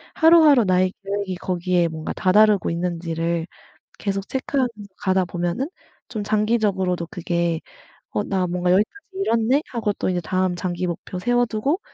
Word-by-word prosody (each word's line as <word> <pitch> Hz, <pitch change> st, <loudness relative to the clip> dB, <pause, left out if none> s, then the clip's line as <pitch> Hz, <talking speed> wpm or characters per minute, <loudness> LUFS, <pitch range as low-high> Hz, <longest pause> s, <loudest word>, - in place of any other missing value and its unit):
하루하루 320 Hz, -6 st, +6 dB
나의 185 Hz, 0 st, +2 dB
계획이 200 Hz, -1 st, -3 dB
거기에 180 Hz, -1 st, 0 dB
뭔가 160 Hz, -1 st, -5 dB
다다르고 205 Hz, +1 st, +4 dB
있는지를 170 Hz, -1 st, -2 dB, 0.5 s
계속 195 Hz, -1 st, -3 dB
체크하면서 265 Hz, -1 st, 0 dB, 0.3 s
가다 190 Hz, -1 st, +2 dB
보면은 175 Hz, -, -2 dB, 0.4 s
좀 215 Hz, -4 st, -4 dB
장기적으로도 205 Hz, -5 st, +1 dB
그게 170 Hz, -3 st, -1 dB, 0.5 s
'어 -, -, -1 dB
나 190 Hz, -2 st, 0 dB
뭔가 180 Hz, 0 st, 0 dB
여기까지 210 Hz, -, +1 dB
이뤘네.' 260 Hz, -, +2 dB
하고 225 Hz, -4 st, -1 dB
또 -, -, -3 dB
다음 185 Hz, +1 st, 0 dB
장기 180 Hz, 0 st, -2 dB
목표 175 Hz, +1 st, -5 dB
세워두고 245 Hz, -, +1 dB
190 Hz, 335 characters per minute, -22 LUFS, 175-220 Hz, 0.5 s, 하루하루